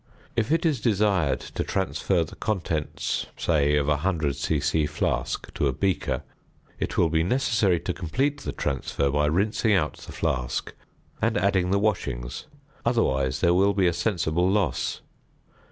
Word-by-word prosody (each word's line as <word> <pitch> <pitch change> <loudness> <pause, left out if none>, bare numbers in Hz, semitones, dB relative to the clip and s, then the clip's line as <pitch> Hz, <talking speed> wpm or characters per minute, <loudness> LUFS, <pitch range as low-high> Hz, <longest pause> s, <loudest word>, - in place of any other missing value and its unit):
If 115 +3 0
it 165 +1 +2
is 145 -8 +1
desired 95 - +2
to - - -4
transfer 95 -2 0
the 80 - -10
contents 85 -7 -2
say 75 -3 +2
of 75 -1 +2
a 75 0 +1
100 80 -7 0
c.c. 75 +1 0
flask 75 +1 -2
to 75 - +1
a 65 - 0
beaker, 95 +1 -1 0.6
it - - -3
will 85 - +4
be 80 -1 +3
necessary 110 -3 +2
to - - -2
complete 135 - -1
the - - -3
transfer 70 +1 -1
by 75 +1 +2
rinsing 105 +7 +2
out 95 - +1
the - - -11
flask 60 -2 -2 0.5
and - - +2
adding 95 -1 +2
the 100 - +3
washings; 70 - -2 0.4
otherwise 70 - +1
there 85 -1 +4
will 100 +3 +4
be 95 -2 +3
a 85 - +3
sensible 85 -1 +1
loss. 100 0 0
85 Hz, 155 wpm, -26 LUFS, 75-100 Hz, 0.6 s, will